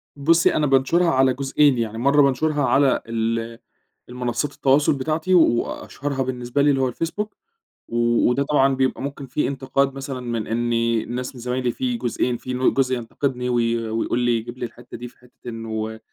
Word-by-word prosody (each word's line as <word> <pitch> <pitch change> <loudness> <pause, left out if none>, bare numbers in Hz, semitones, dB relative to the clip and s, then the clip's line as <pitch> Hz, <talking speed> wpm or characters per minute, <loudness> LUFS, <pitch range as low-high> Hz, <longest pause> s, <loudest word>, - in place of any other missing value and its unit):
بصي 165 +4 +3
أنا 155 - +2
بانشرها 135 +6 +3
على 130 0 +3
جزئين 140 +1 +2
يعني، 115 -1 -2
مرّة 140 +5 +4
بانشرها 145 +2 +1
على 135 0 +3
ال 115 0 -2 0.5
المنصات 125 +3 -2
التواصل 140 +1 +3
بتاعتي، 160 +6 -1
و 180 - +7 0.2
وأشهرها 140 -1 -4
بالنسبة 125 +1 -2
لي 145 - +4
اللي 135 -2 +2
هو 130 - +2
الفيسبوك. 165 - -4 0.5
و 120 0 +2
وده 135 +3 +1
طبعًا 140 -2 +2
بيبقى 130 0 0
ممكن 140 0 -5
في 150 - -1
إنتقاد 135 0 0
مثلًا 135 -1 -5
من 120 -3 -3
إن 120 +1 -1 0.3
الناس 125 +2 -5
من 120 - -10
زمايلي 125 0 -1
في 125 0 -2
جزئين، 120 0 -1
في 130 - -6
ن 125 +1 +2
جزء 130 -1 +1
ينتقدني 125 +1 -3
وي 115 -1 0
ويقول 115 +2 -1
لي 120 -1 +2
يجيب 120 +2 -7
لي 125 - -3
الحتة 120 +1 -11
دي 120 - -7
في 120 - -18
حتة 125 0 -18
إنه 110 -1 -5
130 Hz, 180 wpm, -22 LUFS, 120-140 Hz, 0.5 s, و